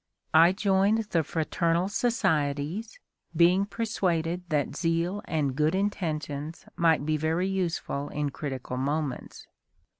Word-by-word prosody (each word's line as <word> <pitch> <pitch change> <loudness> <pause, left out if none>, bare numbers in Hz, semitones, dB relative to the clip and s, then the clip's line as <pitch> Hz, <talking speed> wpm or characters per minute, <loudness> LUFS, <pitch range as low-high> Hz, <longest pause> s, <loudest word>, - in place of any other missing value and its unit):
I 165 +2 +7
joined 200 +2 +2
the 165 - +3
fraternal 165 +3 0
societies, 165 - -1 0.4
being 175 +4 +4
persuaded 180 -7 -1
that 150 -2 0
zeal 170 +4 0
and 145 -5 -1
good 155 +4 +2
intentions 160 -6 -3
might 160 -4 +3
be 155 0 +1
very 160 +4 0
useful 170 -6 -2
in 145 -1 -2
critical 130 -3 -5
moments. 140 0 -3
165 Hz, 115 wpm, -27 LUFS, 150-190 Hz, 0.4 s, I